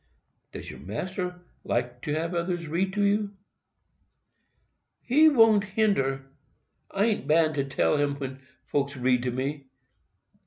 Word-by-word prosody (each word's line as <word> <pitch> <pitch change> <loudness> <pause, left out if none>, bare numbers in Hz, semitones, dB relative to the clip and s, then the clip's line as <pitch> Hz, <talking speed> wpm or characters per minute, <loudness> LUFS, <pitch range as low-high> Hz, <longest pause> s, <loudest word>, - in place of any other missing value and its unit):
"Does - - -8
your - - -11
master 180 - -4 0.2
like 120 0 -2
to 150 - -3
have 165 +3 -2
others 170 -1 -2
read 180 +5 0
to 205 0 +1
you?" 205 0 +1 1.7
"He 305 +5 +6
won't 225 -7 +5
hinder—I 195 -1 -2
an't 215 -11 -1
bound 155 -3 +2
tell 140 - +2
him 145 -1 +1
when 135 -1 -6 0.3
folks 140 0 -1
reads 125 0 +1
to 125 - 0
me. 135 +3 -3
155 Hz, 125 wpm, -27 LUFS, 135-200 Hz, 1.7 s, He